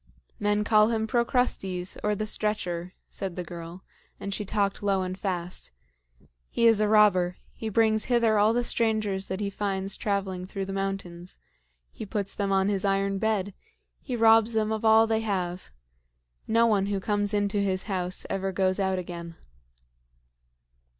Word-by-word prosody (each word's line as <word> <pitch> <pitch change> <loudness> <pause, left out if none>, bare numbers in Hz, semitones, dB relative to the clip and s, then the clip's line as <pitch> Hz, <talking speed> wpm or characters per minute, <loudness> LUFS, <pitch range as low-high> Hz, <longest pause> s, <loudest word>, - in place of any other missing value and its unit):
"Men 210 0 +1
call 215 0 +5
him 220 -1 0
Procrustes, 220 -6 0
or 210 0 +1
the 215 - -2
Stretcher," 185 -5 -2 0.2
said 190 -3 -3
the 180 - -4
girl 170 +1 -9 0.4
and 200 - -4
she 210 - -2
talked 200 0 -1
low 195 -2 +1
and 185 0 -4
fast. 180 - -4 0.8
"He 235 - +1
is 225 -2 +5
a 210 - +3
robber. 200 -4 +4 0.2
He 220 - -5
brings 220 0 +2
hither 235 -4 +3
all 210 +2 +4
the 240 +1 +1
strangers 215 -5 0
that 190 +1 -4
he 200 -1 -2
finds 195 -1 -2
traveling 190 -3 -2
through 195 0 -4
the 195 - -5
mountains. 195 -3 -4 0.5
He 215 - -8
puts 200 -1 -2
them 200 -1 -2
on 195 0 +2
his 200 -2 0
iron 195 0 +1
bed. 205 -2 0 0.5
He 255 - -4
robs 225 0 +5
them 220 -1 0
of 220 0 -2
all 220 0 +6
they 220 0 +1
have. 185 -4 -3 0.8
No 230 +1 +4
one 205 -4 +2
who 200 -1 -1
comes 205 +1 0
into 205 -1 0
his 190 -1 -1
house 185 -3 -2
ever 195 0 -2
goes 185 +1 0
out 190 -1 +1
again." 170 -2 -6
200 Hz, 165 wpm, -27 LUFS, 190-215 Hz, 0.8 s, all